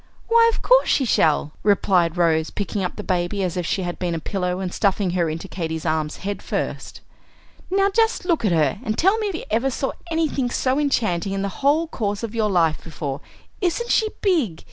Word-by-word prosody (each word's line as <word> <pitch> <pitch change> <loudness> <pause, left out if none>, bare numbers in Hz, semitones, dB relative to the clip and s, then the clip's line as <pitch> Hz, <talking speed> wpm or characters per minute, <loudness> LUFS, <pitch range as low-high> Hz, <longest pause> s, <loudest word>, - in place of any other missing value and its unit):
"Why, 460 0 +6
of - - -5
course - - +5
she 270 - +3
shall," 155 -8 +2
replied 185 -4 +2
Rose, 160 -2 +2
picking 200 0 -3
up 180 - -3
the 210 - -6
baby 185 +1 -1
as 180 -3 -2
if 175 -2 -2
she 190 - -1
had 175 -1 -4
been 175 -2 -1
a - - -2
pillow, 180 +1 -2
and 185 -2 -4
stuffing 195 -2 +1
her 175 -2 0
into 165 +4 -5
Katy's 160 -3 -4
arms 155 -1 -1
head 205 0 -3
first. - - -4 0.7
"Now, 390 +1 +2
just 450 -2 +1
look 335 -8 +1
at 205 - +2
her, 155 -1 +2
and 215 0 -2
tell 390 +6 +3
me 430 - -1
if 370 -5 -4
ever 230 +5 +2
you - - 0
saw 270 +1 -2 0.2
anything 315 -6 0
so 260 +3 0
enchanting 205 - 0
in 195 0 -2
the 200 -2 -5
whole 300 +4 +3
course 205 -7 -3
of 230 -1 -4
your 220 -2 +1
life 165 -5 +1
before? 145 -4 -5 0.4
Isn't 405 +6 0
she 435 -2 +3
big? 295 - +1
200 Hz, 210 wpm, -22 LUFS, 175-290 Hz, 0.7 s, Why